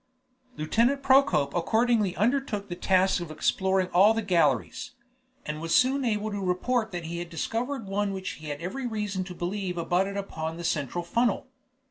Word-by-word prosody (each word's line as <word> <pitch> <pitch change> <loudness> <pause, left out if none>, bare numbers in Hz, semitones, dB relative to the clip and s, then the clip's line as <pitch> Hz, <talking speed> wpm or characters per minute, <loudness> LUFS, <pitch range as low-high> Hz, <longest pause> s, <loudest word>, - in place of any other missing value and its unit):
Lieutenant 235 - +1
Procope 260 - +4
accordingly 220 +1 +2
undertook 215 -3 0
the 175 - -4
task 185 0 +2
of 170 - -6
exploring 190 +4 +1
all 200 +6 +5
the 225 - -1
galleries, 165 - +1 0.5
and 150 +1 -4
was 165 0 0
soon 265 +2 +3
able 215 -2 -1
to 205 -1 -3
report 220 +5 0
that 175 -2 -5
he 170 +1 -4
had 175 0 -6
discovered 230 - -3
one 200 +1 -1
which 190 0 -4
he 155 - -10
had 145 -1 -4
every 245 +9 -4
reason 210 -4 -2
to 180 -1 -8
believe 180 +1 -3
abutted 185 +4 0
upon 160 -5 -4
the 170 - -6
central 155 +1 -1
funnel. 230 +7 0
190 Hz, 170 wpm, -27 LUFS, 170-225 Hz, 0.5 s, all